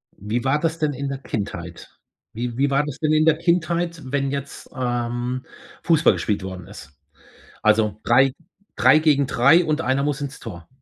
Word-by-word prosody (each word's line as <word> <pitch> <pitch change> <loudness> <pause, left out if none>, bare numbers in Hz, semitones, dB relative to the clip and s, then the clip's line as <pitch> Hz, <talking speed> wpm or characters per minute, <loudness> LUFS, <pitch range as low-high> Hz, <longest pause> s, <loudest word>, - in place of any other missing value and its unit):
Wie 110 +5 -3
war 135 +3 +1
das 165 0 -2
denn 150 -2 0
in 140 +1 -4
der 135 - -3
Kindheit? 90 -8 -6 0.4
Wie 120 +1 -4
wie 140 +1 +2
war 140 +1 +2
das 145 -1 -7
denn 155 -1 +1
in 155 0 +3
der 160 -1 +4
Kindheit, 170 -1 0
wenn 140 0 -1
jetzt, 140 0 -6
ähm, 120 0 -2 0.4
Fußball 165 -3 +4
gespielt 105 -3 -2
worden 95 -2 -7
ist? 70 - -12 0.7
Also 110 -1 +2
3- 130 +3 +4 0.4
3 155 - +6
gegen 145 -3 +3
3 140 +8 +4
und 155 -1 0
1 130 +2 0
muss 145 0 -1
ins 140 -1 -6
Tor. 85 -2 -9
135 Hz, 180 wpm, -22 LUFS, 120-155 Hz, 0.7 s, 3